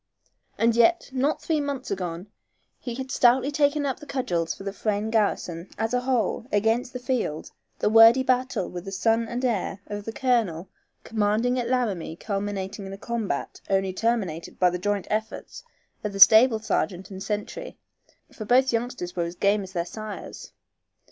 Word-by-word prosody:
And 230 0 +3
yet, 335 +7 +3
not 270 +3 0
three 315 -2 0
months 280 -2 -4
agone 180 -2 -4 0.5
he 240 -3 -5
had 265 +1 -6
stoutly 260 +3 +4
taken 290 0 +2
up 270 -2 -2
the 295 - -12
cudgels 175 -13 -1
for - - -10
the 195 0 -4
Frayne 210 +1 -2
garrison, 190 -5 -1
as 225 +2 -1
a 250 - +3
whole, 250 -2 -1
against 225 +4 +1
the 250 - -5
field, 245 - -2 0.3
the - - 0
wordy 225 +4 +7
battle 255 0 0
with 180 +1 -7
the 195 - -6
son 225 +4 +1
and 245 +3 -3
heir 200 -4 -1
of 205 0 -6
the 225 - -4
colonel 220 -9 0 0.3
commanding 225 +3 +1
at 240 -1 -2
Laramie 215 -11 -1
culminating 195 0 -4
in 195 - -7
a - - -7
combat 230 0 -4
only 195 -1 +1
terminated 190 -7 -2
by 180 -1 +4
the 180 - -3
joint 205 +1 -1
efforts 215 +1 -4 0.4
of 210 -1 -3
the 195 - -5
stable 220 +4 +8
sergeant 190 -3 -2
and 190 0 -8
sentry, 210 - -5 0.6
for 215 - -7
both 255 +3 +4
youngsters 230 -6 -3
were 170 -1 -1
game 200 +3 +2
as 190 -1 -9
their 170 -2 -1
sires. 215 +2 -8
220 Hz, 175 wpm, -25 LUFS, 195-250 Hz, 0.6 s, stable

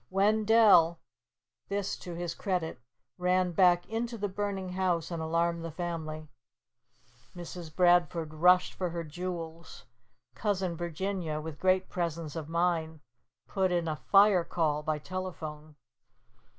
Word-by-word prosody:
Wendell 205 -4 +5 0.7
this 200 0 -2
to 175 -2 -8
his 170 -1 -3
credit 180 -7 -3 0.4
ran 180 0 +2
back 175 0 +4
into 230 +1 -3
the 205 -1 -2
burning 195 -1 -3
house 180 -3 -1
and 165 -1 -3
alarmed 165 +1 0
the 165 - -4
family. 160 -2 -5 1.1
Mrs. 175 -1 -8
Bradford 175 -3 +3
rushed 180 +3 +4
for 180 -2 -2
her 170 0 -4
jewels. 165 0 -7 0.5
Cousin 190 -4 -1
Virginia, 175 -1 -3
with 155 -1 -7
great 185 0 +2
presence 165 -3 -3
of 160 -2 -5
mind, 165 -2 0 0.5
put 190 -2 0
in 175 -2 0
a 155 - -1 0.2
fire 195 -3 +6
call 155 -3 0
by 155 0 -1
telephone. 155 -3 -6
175 Hz, 125 wpm, -30 LUFS, 160-185 Hz, 1.1 s, fire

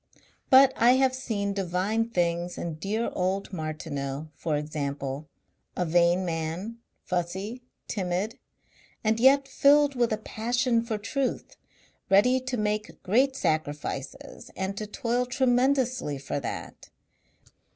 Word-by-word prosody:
But 265 0 +7
I 240 +2 +6
have 260 0 +3
seen 215 -6 -2
divine 195 +4 -1
things 175 -3 -1
in 160 -2 -5
dear 215 +6 -1
old 190 +2 -1
Martineau, 155 -3 -4
for 155 -1 -1
example. 145 -1 -4 0.5
A 180 - +1
vain 175 +2 +3
man, 170 +7 -4 0.2
fussy, 190 +7 -3 0.3
timid 195 +3 -2 0.6
and 220 0 +2
yet 270 +2 +5
filled 285 +1 +4
with 240 -3 +1
a 215 - +1
passion 235 +2 0
for 230 -2 -2
truth, 265 +5 -3 0.5
ready 250 +7 +5
to 255 0 -3
make 210 0 -2
great 260 +7 +3
sacrifices 150 - -3
and 190 +1 -3
to 215 +1 -5
toil 245 +2 -1
tremendously 255 - +1
for 135 +1 -3
that. 130 - -7
205 Hz, 120 wpm, -27 LUFS, 170-245 Hz, 0.6 s, But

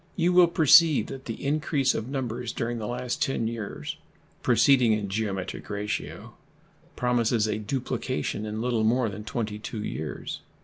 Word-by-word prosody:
You 175 +2 +2
will 180 -1 +7
perceive 165 -1 +6
that 135 0 -10
the 115 +4 -6
increase 145 -2 +1
of 110 - -3
numbers 125 -3 -3
during 120 0 -3
the 105 - -4
last 125 +1 -3
10 115 -4 0
years, 115 -3 -5 0.4
proceeding 125 -5 +4
in 105 -2 -2
geometric 95 -2 -3
ratio, 105 0 -4 0.6
promises 120 -2 +1
a 110 0 -1
duplication 130 -1 -3
in 110 +1 -4
little 120 -3 +1
more 115 +1 +2
than 105 +1 -7
22 105 0 -4
years. 75 -6 -5
115 Hz, 145 wpm, -26 LUFS, 105-130 Hz, 0.6 s, will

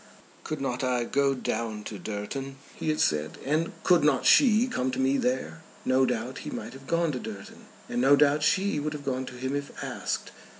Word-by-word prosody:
"Could 155 - -4
not 130 -2 -2
I 125 -2 +1
go 140 +2 +1
down 110 -4 -3
to 105 -1 -7
Durton," 110 +8 -5 0.2
he - - -3
had 155 - 0
said, 75 0 +1
"and 155 +4 +1
could 175 -4 +4
not 150 - +3
she 235 -3 +6
come 130 - -1
to 130 0 -3
me 135 +1 +3
there?" 125 -13 -1 0.2
No 130 0 +3
doubt 125 +1 -3
he - - -6
might - - -6
have 135 0 -13
gone 170 0 +1
to 130 - -3
Durton, 105 -5 -9 0.2
and 120 - -1
no 135 +2 +6
doubt 145 +1 +4
she 190 +1 +2
would 150 +1 -2
have 145 -1 -7
gone 130 -1 -2
to - - -8
him 130 +2 -3
if 145 0 -4
asked. - - -3
135 Hz, 210 wpm, -27 LUFS, 125-150 Hz, 0.2 s, she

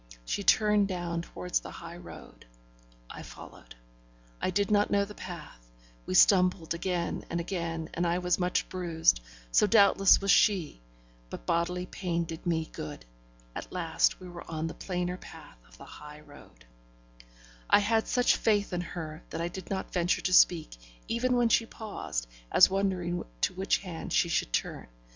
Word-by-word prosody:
She 200 - -2
turned 210 0 +4
down 175 -3 -3
towards 90 - -3
the - - -10
high - - -9
road; - - -13 0.6
I - - -9
followed. - - -12 0.7
I - - 0
did 200 +2 0
not 205 0 +3
know 200 0 +2
the 210 - -10
path; 150 - -10 0.4
we 90 - -2
stumbled 180 - +4
again 175 0 -2
and 170 - -2
again, 165 -2 -3
and 175 +1 0
I 170 +1 +1
was 180 0 0
much 180 0 0
bruised; 165 - +1 0.3
so 210 - +4
doubtless 200 -2 +6
was 195 0 +2
she; 180 - +3 0.5
but - - -8
bodily 180 - 0
pain 175 -2 -2
did 165 +1 -7
me 160 -2 0
good. 75 -5 -7 0.5
At - - -7
last, 170 -3 +1
we 185 - -10
were 175 -1 -10
on 160 -1 -3
the 165 - -4
plainer 180 -1 -3
path - - -13
of - - -18
the - - -12
high 150 0 -12
road. 145 - -17 1.0
I - - +7
had 220 +2 +1
such 245 -1 +3
faith 205 -3 +1
in 175 - -1
her 160 -2 -7
that 165 - -5
I 170 +1 -2
did 185 0 -9
not 190 -1 -4
venture 175 0 +1
to 185 - -1
speak, 170 - +4 0.3
even 250 +2 0
when 240 -1 +3
she 230 0 +3
paused, 205 - -5 0.3
as - - +7
wondering 185 -3 -1 0.2
to - - +1
which 190 +1 +1
hand 175 -4 -7
she 170 - +3
should 110 - 0
turn. - - -2
175 Hz, 170 wpm, -29 LUFS, 165-195 Hz, 1.0 s, I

